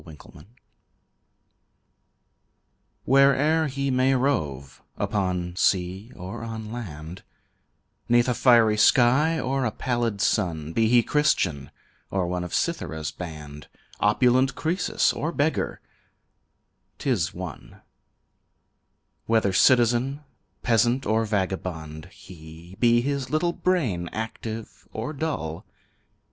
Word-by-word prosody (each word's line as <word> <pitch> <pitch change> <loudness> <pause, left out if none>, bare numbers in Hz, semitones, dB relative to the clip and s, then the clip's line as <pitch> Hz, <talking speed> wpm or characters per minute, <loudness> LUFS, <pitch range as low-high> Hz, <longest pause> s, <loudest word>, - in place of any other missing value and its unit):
The - - -14 0.2
Lid - - -16 2.6
Where'er 140 +4 +4
he 140 0 -2
may 130 +1 +2
rove, 75 - -2 0.2
upon 90 -3 -2
sea 95 +4 0
or 95 +6 -7
on 110 -1 -6
land, 90 -7 -7 0.9
'Neath 120 +1 +4
a 125 - +2
fiery 115 -3 +4
sky 130 +9 +4
or 135 0 -1
a 125 - +1
pallid 120 -2 -2
sun, 80 -5 0
Be 115 +3 +2
he 120 +1 +4
Christian 90 - 0 0.4
or 95 -2 -1
one 90 0 -2
of 90 - -7
Cythera's 80 -2 -2
band, 75 -4 -9 0.3
Opulent 125 +5 +3
Croesus 175 +4 0
or 160 - -3
beggar 155 0 -1 1.2
'tis - - 0
one, - - -9 1.4
Whether 110 -4 +2
citizen, 125 +5 +3 0.4
peasant 120 +2 +2
or 110 +2 +1
vagabond 90 -7 -3
he, 85 0 -13
Be 120 -1 +4
his 140 0 -2
little 155 +4 0
brain 120 - -1
active 110 0 -6
or 115 +7 -5
dull. 135 - -4
115 Hz, 105 wpm, -25 LUFS, 90-130 Hz, 2.6 s, Where'er